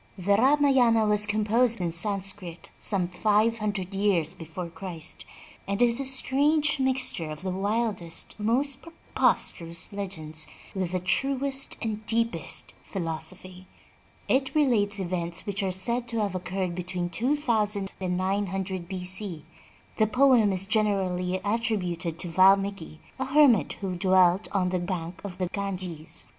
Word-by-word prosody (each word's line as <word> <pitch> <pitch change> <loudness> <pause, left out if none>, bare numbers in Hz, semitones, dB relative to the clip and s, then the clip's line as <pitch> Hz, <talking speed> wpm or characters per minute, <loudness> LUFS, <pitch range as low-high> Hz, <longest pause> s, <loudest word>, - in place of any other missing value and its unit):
The 200 +2 +2
Ramayana 260 -3 +4
was 210 0 +2
composed 220 +3 +2
in 175 -2 -1
Sanscrit 190 -1 0
some 190 -4 +1
five 215 +5 +1
hundred 200 -3 -3
years 190 -5 +2
before 170 +1 -7
Christ, 170 -2 -4 0.4
and 200 +1 -2
is 240 0 +4
a 275 - -2
strange 285 +3 +2
mixture 255 -11 +1
of 155 +3 -8
the 190 - -2
wildest 195 -3 -1
and 210 - -2
most 270 +3 +1
preposterous 170 - 0
legends 160 -6 -3 0.3
with 185 -3 -3
the 185 - +1
truest 270 +7 -1
and 215 -1 -3
deepest 230 +1 0
philosophy. 185 +1 -6 0.6
It 265 +3 +1
relates 215 -9 +2
events 175 -2 -3
which 200 0 -2
are 190 -1 -1
said 235 +6 -1
to 230 -2 0
have 200 -3 -1
occurred 185 0 -3
between 180 0 -4
two 250 - +1
thousand 210 -8 +1
and 180 -1 -1
nine 195 +2 0
hundred 190 -1 -4
B. 185 -1 -5
C. 185 -4 -1 0.5
The 215 - +3
poem 250 -2 +4
is 190 0 +2
generally 190 -4 0
attrib 220 -1 0
uted 170 -1 -5
to 180 - -1
Valmiki, 190 -2 +2 0.2
a 265 - -1
hermit 265 - +4
who 190 -2 -2
dwelt 185 +1 +3
on 185 -2 +1
the 180 0 -1
bank 175 -1 -5
of 190 -3 -7
the 185 - -1
Ganges. 185 -6 -5
195 Hz, 150 wpm, -26 LUFS, 180-230 Hz, 0.6 s, Ramayana